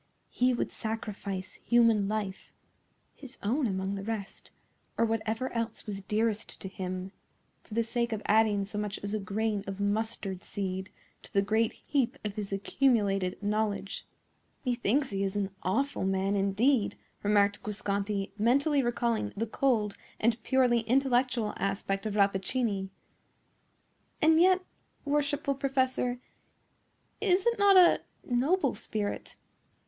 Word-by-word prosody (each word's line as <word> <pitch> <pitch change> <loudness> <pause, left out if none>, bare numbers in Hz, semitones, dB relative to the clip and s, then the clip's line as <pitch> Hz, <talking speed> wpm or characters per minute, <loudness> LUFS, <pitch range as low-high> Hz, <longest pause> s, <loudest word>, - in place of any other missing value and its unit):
He 250 +1 +3
would 245 - -1
sacrifice 210 -4 -4
human 230 -4 +4
life, 205 -2 -3 0.6
his 270 -2 -8
own 245 +6 +1
among 190 -1 -2
the 195 -1 -4
rest, 215 -2 -5 0.5
or 230 - +4
whatever 225 +3 -1
else 230 -1 -3
was 200 -2 -5
dearest 215 +2 -1
to - - -5
him, 185 0 -5 0.5
for 215 - -10
the 230 - +3
sake 235 +1 -1
of 220 -1 -3
adding 215 -2 +3
so 205 +1 -4
much 210 0 -3
as 205 +1 -3
a 215 - 0
grain 210 0 -1
of 195 0 -5
mustard 205 -2 -1
seed 190 -1 -4 0.3
to - - -11
the 200 - +3
great 220 +2 +1
heap 275 -2 -1
of 210 - -2
his 205 -1 -5
accumulated 200 -3 +1
knowledge." 205 -1 -1 0.6
"Methinks 250 +2 +1
he 195 0 -1
is 195 0 -1
an 200 -1 -1
awful 275 +9 0
man 195 +1 +1
indeed," 205 +5 +2 0.3
remarked 205 0 +3
Guasconti, 200 -1 -1
mentally 275 +6 +3
recalling 235 - 0
the 225 - 0
cold 220 -3 +1 0.2
and 230 +1 +2
purely 250 -1 +3
intellectual 245 -1 +1
aspect 195 +1 -1
of 210 - -3
Rappaccini. 200 0 +1 1.3
"And 320 +1 +5
yet, 370 +1 +5 0.4
worshipful 285 0 +1
professor, 260 -2 0 1.0
is 380 -2 +3
it 470 -2 +2
not 400 -1 +7
a 360 -2 +7 0.2
noble 275 +4 +1
spirit? 210 -1 -4
220 Hz, 135 wpm, -30 LUFS, 200-250 Hz, 1.3 s, not